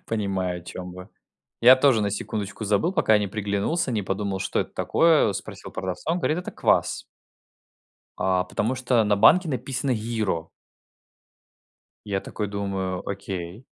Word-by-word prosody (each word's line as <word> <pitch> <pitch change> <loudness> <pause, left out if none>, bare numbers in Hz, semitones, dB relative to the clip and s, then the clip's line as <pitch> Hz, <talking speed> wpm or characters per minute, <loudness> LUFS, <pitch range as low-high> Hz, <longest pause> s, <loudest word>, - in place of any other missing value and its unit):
Понимаю, 95 -5 -2
о - - -19
чем 90 0 -7
вы. 90 +2 -10 0.5
Я 125 +2 +9
тоже 130 -4 +4
на 100 - 0
секундочку 105 +1 -4
забыл, 105 - +2
пока 140 - +4
не 105 -1 -1
приглянулся, 105 - -1
не 110 -4 -1
подумал, 95 0 -2
что - - -1
это - - -3
такое, 165 -7 +3
э, 100 - -2
спросил 95 - -8
продавца, 95 - -3
он 175 - 0
говорит: 155 +1 0
"Это 180 - -7
квас". - - +1 1.1
А, 95 -1 +1
потому 110 +7 -2
что 125 -3 +2
на 105 -1 +2
банке 165 - +6
написано 130 +1 -2
"Йиро". 110 -8 -2 1.6
Я 100 -2 -1
такой 105 +1 -5
думаю: 95 -2 -3
"Окей". 95 +2 -5
105 Hz, 150 wpm, -25 LUFS, 95-125 Hz, 1.6 s, Я